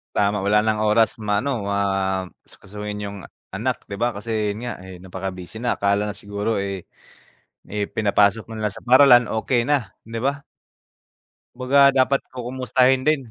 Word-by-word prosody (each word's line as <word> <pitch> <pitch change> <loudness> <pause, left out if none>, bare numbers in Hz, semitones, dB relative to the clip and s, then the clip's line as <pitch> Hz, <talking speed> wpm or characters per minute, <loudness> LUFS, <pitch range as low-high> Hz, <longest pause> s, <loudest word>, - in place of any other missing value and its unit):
Tama, 100 0 +1
wala 105 +2 +3
ng 110 -1 +1
oras 110 +1 +2
ma-ano 105 +4 -1
ma 100 - 0 0.6
asikasuhin 105 +1 -7
yung 100 0 -7 0.4
anak - - -2
'di 100 - -7
ba? 120 +4 0
Kasi 110 0 -2
'yon 100 - -5
nga, 120 - -3
eh, 95 -1 -10
napakabusy 95 +3 -7
na. 120 - 0
Akala 100 +1 +2
na 105 - -2
siguro, 105 +2 -2
eh, 100 -1 -3 0.9
eh, 105 0 -2
pinapasok 105 +1 +1
na 110 - -6
lang 100 - -2
sa - - -10
paaralan 125 -2 +6
okey 120 +2 0
na, 130 -6 -1
'di 115 +1 -6
ba? 140 +4 -1 1.1
'Baga 140 +2 +5
dapat 135 0 +2
ku-kumustahin 130 +1 +1
din. 140 -6 +1
110 Hz, 160 wpm, -22 LUFS, 100-125 Hz, 1.1 s, paaralan